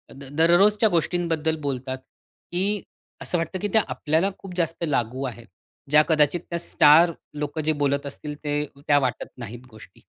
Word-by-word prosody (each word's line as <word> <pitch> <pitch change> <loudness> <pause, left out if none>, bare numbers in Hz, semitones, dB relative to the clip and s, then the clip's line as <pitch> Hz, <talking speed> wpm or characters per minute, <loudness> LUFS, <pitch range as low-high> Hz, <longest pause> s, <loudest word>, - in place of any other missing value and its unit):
The 140 - -11
दररोजच्या 200 +7 +5
गोष्टींबद्दल 165 -2 0
बोलतात, 130 -2 -3 0.5
की 195 +3 0 0.4
असं 175 - 0
वाटतं 165 +3 -3
की 205 - -1
त्या 220 -2 +5
आपल्याला 160 +6 0
खूप 185 -2 -9
जास्त 165 -1 -1
लागू 130 -1 -1
आहेत. 120 -2 -7 0.4
ज्या 150 +1 +6
कदाचित 155 +2 +3
त्या 170 -1 -2
स्टार 160 +1 +5 0.2
लोकं 150 +1 -3
जे 155 +1 +2
बोलत 140 0 0
असतील 145 +1 -6
ते 145 0 -1 0.2
त्या 145 -1 +5
वाटत 130 -4 -2
नाहीत 120 0 -8
गोष्टी. 110 - -15
155 Hz, 160 wpm, -24 LUFS, 140-175 Hz, 0.5 s, ज्या